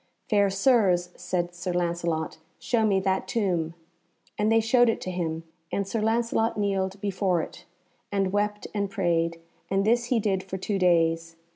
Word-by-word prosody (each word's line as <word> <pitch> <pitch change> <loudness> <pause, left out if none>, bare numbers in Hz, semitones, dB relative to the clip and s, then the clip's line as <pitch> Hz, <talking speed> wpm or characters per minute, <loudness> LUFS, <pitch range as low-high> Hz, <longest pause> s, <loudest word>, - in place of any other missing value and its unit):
"Fair 200 -2 +4
Sirs," 195 -4 +3
said 175 -1 -2
Sir 175 +1 -4
Lancelot, 170 -2 -1 0.2
"show 235 -2 0
me 195 -2 +3
that 190 0 0
tomb;" 175 -6 -1 0.6
and 210 +1 +1
they 225 - +5
showed 240 +2 +4
it 225 - 0
to 185 - -4
him, 165 -2 -3 0.3
and 200 -1 -1
Sir 220 +2 -2
Lancelot 225 0 +1
kneeled 195 -1 -1
before 190 -3 +1
it, - - -10 0.5
and 195 -1 0
wept 210 0 0
and 200 -2 -1
prayed, 170 -4 0 0.3
and 195 +1 +1
this 235 +2 +3
he 240 -1 +1
did 195 -3 0
for 190 0 -6
two 195 +1 -2
days. 165 -2 +2
190 Hz, 165 wpm, -26 LUFS, 175-210 Hz, 0.6 s, they